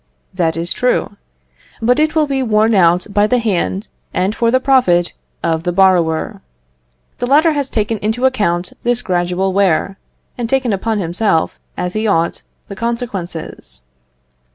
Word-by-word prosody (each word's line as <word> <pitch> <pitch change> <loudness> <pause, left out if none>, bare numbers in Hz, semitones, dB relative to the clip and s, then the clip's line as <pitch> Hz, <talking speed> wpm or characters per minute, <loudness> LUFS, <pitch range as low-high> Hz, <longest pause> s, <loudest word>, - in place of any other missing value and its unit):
That 165 -3 0
is 170 +2 -2
true; 250 -4 0 0.6
but 245 +4 +2
it 310 +1 +1
will 310 -1 +3
be 275 -2 -1
worn 220 -2 +2
out 180 -2 +3
by 205 +1 +3
the 250 - +2
hand 205 -2 -1 0.3
and 190 +3 +1
for 230 +1 +1
the 255 +2 +3
profit 245 -11 +2 0.3
of 165 -1 0
the 175 +1 -1
borrower. 175 -4 +2 0.8
The 245 - -1
latter 305 +5 +4
has 285 -2 -2
taken 215 0 -1
into 220 +5 -1
account 180 -9 0
this 245 0 0
gradual 180 +1 0
wear, 195 0 +1 0.4
and 235 -2 -2
taken 260 -4 +1
upon 220 +3 -1
himself, 175 -1 0 0.2
as 180 0 -3
he 215 +1 -1
ought, 170 -5 0 0.3
the 200 - -8
consequences. 190 - -5
205 Hz, 155 wpm, -16 LUFS, 175-240 Hz, 0.8 s, latter